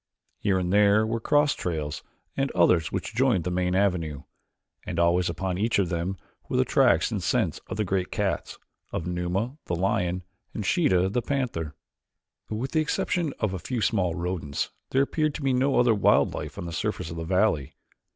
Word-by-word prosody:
Here 100 -2 +1
and 90 0 -1
there 105 +1 +5
were 115 +1 -1
cross 145 +5 +3
trails 75 -4 -3 0.3
and 135 0 0
others 85 -2 +3
which - - -3
joined 120 -7 +2
the 90 - -2
main 90 0 0
avenue, 90 -7 0 0.6
and 85 - -5
always 85 +1 +3
upon 90 +2 -2
each 115 +3 +1
of 95 -4 +1
them 85 +3 -2 0.3
were - - 0
the - - +3
tracks - - +3
and - - -2
scent - - 0
of - - -5
the 105 - +1
great 95 -1 -1
cats, 95 -6 -2 0.3
of 80 - -3
Numa, 90 +9 -2
the 85 - 0
lion, 90 -1 0 0.3
and 105 - -3
Sheeta, 95 - +3
the 120 +6 0
panther. 115 - -2 0.7
With 115 +5 -3
the 160 - +2
exception 155 +1 0
of 105 -4 0
a 95 - -3
few 125 +8 -3
small 95 -6 +1
rodents 85 -4 -3 0.2
there 135 +1 +3
appeared 155 +1 0
to 150 - -5
be 135 -1 +2
no 135 +2 +2
other 120 -2 +5
wild 100 - +3
life - - -6
on - - -5
the 85 - -6
surface 80 0 -2
of 80 - -6
the 80 - -3
valley. 90 -5 +1
95 Hz, 190 wpm, -26 LUFS, 85-115 Hz, 0.7 s, there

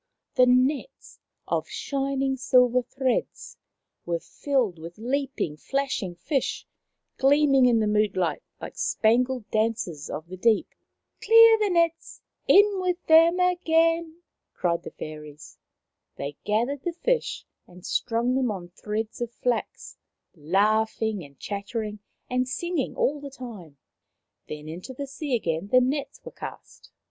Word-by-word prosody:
The 255 - +5
nets, 260 - 0 0.3
of - - -1
shining 275 -1 -1
silver 250 -1 +3
threads, 260 0 -3 0.5
were 170 -1 -1
filled 245 - -1
with 165 +2 -9
leaping, 255 - -2
flashing 270 - -2
fish, 265 - -2 0.5
gleaming 275 -1 +4
in 230 -2 +3
the - - +2
moonlight 205 -6 +1 0.2
like - - -8
spangled 245 +1 +1
dancers 215 -9 -1
of 155 - -5
the 185 +2 -9
deep. 220 +3 +2 0.2
" - - -51
Clear 455 +1 +8
the 420 -1 +1
nets! 335 -2 0 0.3
In 405 -1 +5
with 360 -1 -2
them 330 +2 +6
again! 335 -2 +1
" - - -59
cried 170 -1 0
the - - -8
fairies. 150 0 -10 0.6
They 140 +1 -5
gathered 240 +7 0
the 345 - -3
fish 480 +7 -1 0.2
and 180 0 -15
strung 235 +1 0
them 260 -2 +1
on 185 -4 -5
threads 215 +5 -5
of 240 - -2
flax, 240 0 -3 0.4
laughing, 205 0 0
chattering 210 - -5 0.3
and 255 0 -1
singing 345 +1 -2
all 290 +2 0
the 285 - -7
time. 220 - -10 0.7
Then 150 0 -7
into 180 +11 -8
the 280 - -4
sea 275 0 -3
again 170 -4 -2
the 255 +5 +5
nets 270 +3 -2
were - - -8
cast. - - -10
250 Hz, 135 wpm, -26 LUFS, 200-280 Hz, 0.7 s, Clear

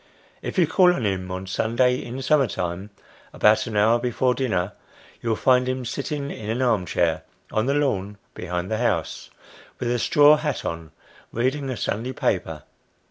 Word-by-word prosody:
If - - -5
you 180 - +5
call 180 +3 +4
on 120 - -2
him 95 -2 -2
on 95 +1 -5
Sunday 120 +6 +1
in 125 +3 -6
summer 140 0 +3
time, 90 +1 -4 0.4
about 105 +3 +3
an 110 -2 -3
hour 110 +3 +4
before 125 +1 +1
dinner, 100 -8 -1 0.5
you 115 - -3
will 110 - +2
find 125 +2 +3
him 130 -1 -3
sitting 140 +3 -4
in 105 -1 -7
an 115 +3 -1
arm 110 -8 +1
chair, 80 -2 +1 0.3
on 110 +3 0
the 140 - +1
lawn 105 -9 -1 0.2
behind 90 +2 -4
the 110 - 0
house, 120 - -1 0.5
with 120 -1 -2
a 120 - 0
straw 150 +5 +6
hat 150 -3 -3
on, 80 -1 -5 0.4
reading 135 +4 -1
a 130 - -3
Sunday 120 +6 -3
paper. - - -2
120 Hz, 180 wpm, -23 LUFS, 100-130 Hz, 0.5 s, straw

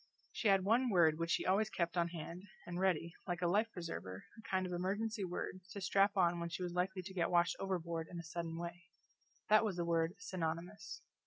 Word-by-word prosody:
She 225 - -1
had 195 -2 +5
one 240 +6 +3
word 165 -6 +4
which 165 0 -1
she - - +1
always 200 +3 +3
kept 175 -4 -1
on 170 -1 +2
hand, 170 +1 -6 0.2
and 175 0 -4
ready, 170 -3 +1
like 175 -1 -2
a - - +4
life 210 +6 +2
preserver, 100 - -6
a 220 - -12
kind 185 -1 +1
of 180 - -4
emergency 205 +4 -1
word 185 +1 -4
to 200 - -5
strap 195 +1 +3
on 175 -2 +4
when 170 0 -2
she 170 +2 -4
was 175 -1 -3
likely 185 +1 -1
to 190 +1 -8
get 175 -3 +1
washed 175 -1 +3
overboard 170 -4 -2
in 175 - -7
a 170 - -5
sudden 165 0 -4
way 175 +1 -6 0.6
that 215 +1 +7
was 210 -4 0
the 175 -1 -1
word 165 +1 +1
Synonymous. 185 - -4
180 Hz, 220 wpm, -37 LUFS, 170-195 Hz, 0.6 s, that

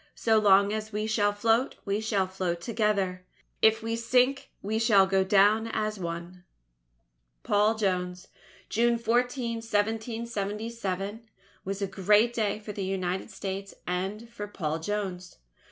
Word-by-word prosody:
So 220 -1 +3
long 200 0 +5
as 215 0 -4
we 210 0 -2
shall 215 -2 +2
float, 225 +5 +1
we 200 +1 -1
shall 210 -3 +1
float 185 -2 -3
together. 200 -3 0 0.4
If 220 0 +4
we 225 0 -1
sink, 250 +4 +2
we 215 +3 -1
shall 210 -4 +5
go 190 0 +2
down 205 +3 +4
as 215 -2 -2
one._ 170 +1 -6 1.0
PAUL 210 +2 +3
JONES 180 -3 -2 0.4
June 235 +2 +2
14, 235 +1 0
1777, 220 -1 -3 0.3
was 195 +1 -3
a - - 0
great 210 +4 +3
day 210 -3 0
for 215 0 -8
the 200 -1 -4
United 185 0 -2
States 195 0 -6
and 190 +6 -3
for 230 -3 -7
Paul 160 -6 -3
Jones. 185 -1 -4
210 Hz, 135 wpm, -28 LUFS, 190-225 Hz, 1.0 s, long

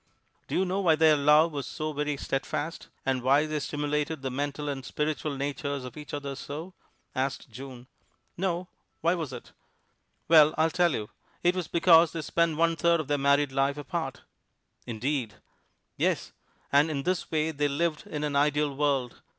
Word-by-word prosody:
"Do - - -3
you 190 - +2
know 190 +2 -1
why 170 -5 +4
their 155 -1 +5
love 150 +3 +5
was 140 -3 -4
so 155 0 -4
very 150 0 -1
steadfast, 145 +4 -3 0.2
and 130 -1 0
why 140 +4 +4
they 155 -1 -2
stimulated 150 0 -2
the 130 - -2
mental 145 +2 -3
and 135 -2 -3
spiritual 150 +1 -2
natures 140 -1 -3
of 125 - -9
each 150 -1 -9
other 140 -1 -4
so?" 155 +7 -7 0.4
asked 130 -1 -3
June. 125 +1 -9 0.5
"No, 180 -1 -1 0.3
why 170 +2 +3
was 160 -6 -3
it?" 125 -2 -9 0.8
"Well, 155 -1 +7
I'll 160 +1 +3
tell 175 -2 +3
you: 105 -3 -4 0.3
it 175 +1 +3
was 180 -3 -2
because 170 -1 +5
they 165 -2 -4
spent 170 0 +1
one 165 0 +3
third 170 +1 +3
of 155 - -4
their 145 -1 +1
married 140 0 +3
life 135 +1 +1
apart." 150 -3 -4 0.6
"Indeed!" 120 -1 -2 0.6
"Yes, - - 0 0.4
and 145 +3 +5
in 140 -3 -2
this 185 +1 -1
way 160 0 0
they 145 -1 0
lived 155 +2 -1
in 150 0 -4
an 145 -1 -1
ideal 145 0 +2
world. 135 -4 0
150 Hz, 175 wpm, -28 LUFS, 140-160 Hz, 0.8 s, Well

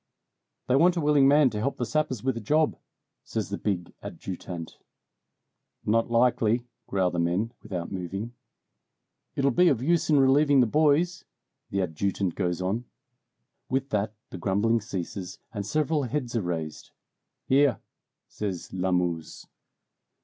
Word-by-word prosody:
"They 125 - +3
want 175 +5 +4
a - - +2
willing 145 -3 +4
man 145 -2 +5
to 105 - -3
help 135 +5 -1
the 120 - -1
sappers 150 -5 -1
with 130 -2 0
a - - -3
job," 150 +8 +2 0.5
says - - -3
the - - -3
big 90 -4 -2
adjutant. 90 -3 -7 1.1
"Not 115 +2 +2
likely!" 120 -1 +2 0.2
growl 95 -2 +1
the 85 - -2
men, 90 +8 0
without 90 -5 -5
moving. 95 +5 -4 1.0
"It'll 140 0 +2
be 180 +9 +4
of 125 -6 +2
use 170 +3 +2
in 150 -2 +5
relieving 140 +1 +5
the 125 - +6
boys," 155 +7 +2 0.5
the 100 -1 0
adjutant 90 +2 -1
goes 90 -1 -1
on. 105 +7 -1 0.8
With 135 +1 -1
that 105 +1 -1 0.2
the 95 - -7
grumbling 105 +6 +1
ceases, 95 -2 -5 0.2
and 100 -2 -4
several 155 +3 +1
heads 125 -1 -3
are 115 - +2
raised. 80 -4 -4 0.6
"Here!" 135 -4 +3 0.5
says 95 -5 -5
Lamuse. 90 -3 -1
115 Hz, 140 wpm, -27 LUFS, 95-140 Hz, 1.1 s, the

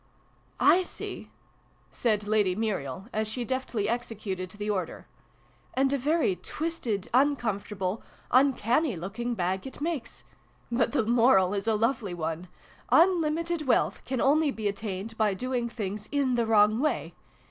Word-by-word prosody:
" - - -36
/ 370 - +4
see! - - -6 0.3
" - - -37 0.3
said 210 -3 0
Lady 210 -4 +2
Muriel, 190 - -3
as 215 0 0
she 240 +3 -3
deftly 245 -4 -2
executed 215 -6 -3
the 205 +2 -6
order. 200 -3 -3 0.4
" - - -34
And 270 +1 +2
a - - +2
very 295 - +1
twisted, 235 - -3
uncomfortable, 215 -7 0 0.3
uncanny 255 - +3
looking 215 +8 -4
bag 190 +4 -1
it 265 - -9
makes! 300 -5 -3 0.5
But 235 +1 +1
the 255 -7 +2
moral 225 -5 +4
is 200 +2 -3
a 220 - +3
lovely 225 -4 0
one. 165 +1 -4 0.4
Unlimited 335 -2 +3
wealth 255 - +2
can 260 -1 -3
only 295 +4 +3
be 220 -6 -2
attained 200 +1 -4
by 210 -3 +2
doing 245 +2 -2
things 210 -2 -5
in 280 -3 +1
the 235 -2 +1
wrong 215 0 +4
way 300 +3 -1
225 Hz, 150 wpm, -28 LUFS, 200-265 Hz, 0.5 s, /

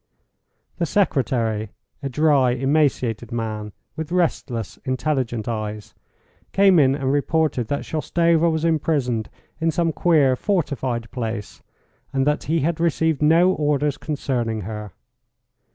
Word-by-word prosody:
The 170 - 0
secretary, 120 - 0 0.3
a 140 - -3
dry, 140 -3 +3
emaciated 130 -4 0
man, 110 -2 -4 0.2
with 160 +1 -5
restless, 135 - -1
intelligent 130 -4 -1
eyes, 110 -2 -4 0.6
came 195 -3 +5
in 135 -2 +4
and 135 -2 -1
reported 145 -4 +1
that 145 - -2
Shoustova 165 +1 +2
was 160 0 -1
imprisoned 140 -8 0 0.3
in 165 0 +1
some 165 0 0
queer, 145 -7 +3
fortified 130 - -2
place, 115 -4 -5 0.5
and 135 -1 +1
that 150 +1 0
he 160 +1 +1
had 165 +3 0
received 160 -2 +1
no 165 +4 +5
orders 145 -2 0
concerning 120 -7 -2
her. 105 0 -6
140 Hz, 120 wpm, -22 LUFS, 120-160 Hz, 0.6 s, came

